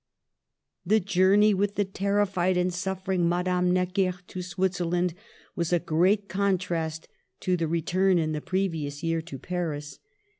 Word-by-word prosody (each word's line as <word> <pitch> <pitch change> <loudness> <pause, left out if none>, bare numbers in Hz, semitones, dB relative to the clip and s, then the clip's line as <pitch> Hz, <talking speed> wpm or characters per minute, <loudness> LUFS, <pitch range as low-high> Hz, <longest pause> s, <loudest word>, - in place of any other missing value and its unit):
The 215 +5 +3
journey 200 +2 +4
with 200 +1 0
the 205 - +1
terrified 195 -2 0
and 180 0 +1
suffering 185 -1 -1
Madame 180 0 +1
Necker 185 +1 +1 0.2
to 185 - -5
Switzerland 180 -1 -1 0.4
was 170 -3 -1
a 175 - +4
great 185 +6 +2
con 195 +1 +1
trast 165 -3 -3 0.3
to 185 - +1
the 165 -2 -1
return 180 +3 +2
in 155 -2 0
the 150 -1 -3
previous 165 -6 -2
year 165 0 0
to 160 -4 -8
Paris. 155 -3 -4
180 Hz, 145 wpm, -27 LUFS, 170-190 Hz, 0.4 s, journey